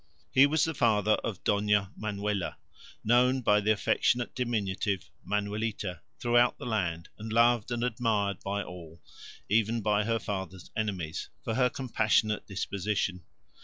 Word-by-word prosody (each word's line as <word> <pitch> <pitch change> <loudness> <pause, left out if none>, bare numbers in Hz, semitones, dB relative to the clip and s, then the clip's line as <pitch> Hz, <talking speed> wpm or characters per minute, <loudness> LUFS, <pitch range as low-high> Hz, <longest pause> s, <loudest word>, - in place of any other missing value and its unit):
He 135 +1 +7
was 155 +1 +2
the 160 - 0
father 110 -6 +2
of 105 -6 -4
Dona 105 -1 +2
Manuela, 105 -2 -2 0.5
known 125 +3 +4
by 105 -1 +4
the 105 +1 +2
affectionate 120 +3 +1
diminutive, 105 -6 -2
Manuelita, 105 -2 -2 0.2
throughout 120 0 +3
the - - -8
land, 90 -8 -2
and 110 +1 -6
loved 115 -1 +3
and 120 -1 -2
admired 110 -5 0
by 100 +1 -2
all, 85 -2 -11 0.4
even 110 +2 +2
by 105 0 +2
her 115 0 +1
father's 95 -4 -5
enemies, 95 -8 -3
for 115 - -2
her 125 +2 +3
compassionate 110 -5 +1
disposition. 100 -1 -2
105 Hz, 135 wpm, -29 LUFS, 100-115 Hz, 0.5 s, He